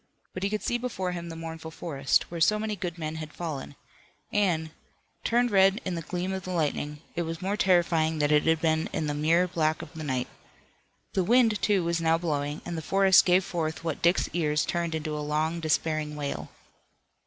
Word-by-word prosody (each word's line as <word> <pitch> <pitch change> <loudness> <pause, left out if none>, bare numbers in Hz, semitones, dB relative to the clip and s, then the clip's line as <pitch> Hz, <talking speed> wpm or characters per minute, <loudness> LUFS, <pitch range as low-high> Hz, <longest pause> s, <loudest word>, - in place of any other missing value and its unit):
But 185 - -5
he 200 - 0
could 215 0 -2
see 240 - 0
before 190 -7 -3
him 170 -1 -5
the 165 - -7
mournful 160 0 -7
forest, 145 -4 0
where 170 -1 -5
so 210 +6 +4
many 215 0 -2
good 180 -3 -5
men 155 -1 -4
had 155 -1 -6
fallen, 155 -5 -5 0.6
and, 170 -6 +1 0.5
turned 240 0 +2
red 195 +1 +5
in 185 - -2
the 170 - -3
gleam 180 +3 -3
of 190 - -3
the 185 - -7
lightning, 150 -3 -1
it 175 - 0
was 165 -1 -4
more 195 +2 -1
terrifying 170 -5 +2
than 150 0 +1
it 150 0 +4
had 160 -1 +3
been 160 -1 +1
in 160 - -1
the 150 - -1
mere 165 +5 +3
black 160 -3 0
of 155 - -12
the 160 -1 -7
night. 130 -4 -1 0.9
The 190 - +2
wind, 225 0 +3
too, 200 -4 +2
was 170 0 0
now 165 0 +3
blowing, 150 -3 -2
and 175 - -4
the 160 - -3
forest 195 +2 +5
gave 185 +1 +4
forth 160 -2 -3
what 165 -3 -3
Dick's 170 +2 +3
ears 150 -3 +1
turned 170 -2 -1
into 155 -1 -3
a - - -3
long 155 +3 -1
despairing 155 -1 0
wail. 145 -1 -4
165 Hz, 210 wpm, -27 LUFS, 155-185 Hz, 0.9 s, red